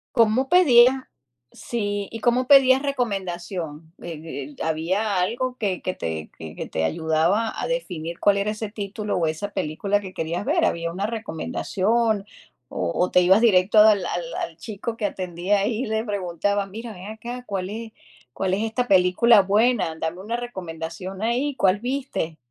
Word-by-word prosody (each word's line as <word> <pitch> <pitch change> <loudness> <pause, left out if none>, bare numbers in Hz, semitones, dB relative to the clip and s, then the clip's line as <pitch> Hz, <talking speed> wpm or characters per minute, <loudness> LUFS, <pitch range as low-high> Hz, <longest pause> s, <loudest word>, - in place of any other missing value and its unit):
¿Cómo 235 +3 +3
pedías? 260 -8 +6 0.6
Sí, 205 -4 -3
¿y 225 - -7
cómo 245 +2 +2
pedías 270 -1 +6
recomendación?, 180 - -4
eh, 150 -4 -7
¿había 185 +6 0
algo 245 +7 -1
que 195 -6 -2
que 185 - -3
te 80 -1 -5
que 80 -1 -8
que - - -6
te 80 - -2
ayudaba 160 - +1
a - - -2
definir 170 - -4
cuál 200 -1 +4
era 200 +1 0
ese 215 0 -5
título 210 0 -4
o 170 -3 +1
esa 160 +6 -3
película 195 +4 -1
que 190 -2 -9
querías 170 +2 -3
ver? 320 +6 +2
¿Había 170 - -1
una 195 +3 -2
recomendación?, 220 0 -1 0.4
o 85 -2 -2
o 180 - +1
te 180 - +5
ibas 190 +4 +5
directo 205 -2 +4
al 210 -3 +6
al 170 -1 -4
al 165 - -4
chico 225 +3 -6
que 210 - 0
atendía 185 +1 -1
ahí 225 +5 -1
y - - -5
le 220 +1 -1
preguntabas: 200 0 -1
"Mira, 225 +3 -7
ven 185 -1 -10
acá, 240 +3 -7
¿cuál 190 -1 -3
es 225 +1 -7 0.4
cuál 190 -1 -1
es 200 +3 0
esta 235 +3 -1
película 195 +3 +5
buena? 205 -2 +2
Dame 160 +3 -3
una 225 +4 -3
recomendación 185 -4 -6
ahí, 250 +5 0
¿cuál 190 -2 +3
viste?" 250 - -3
200 Hz, 170 wpm, -23 LUFS, 175-230 Hz, 0.6 s, pedías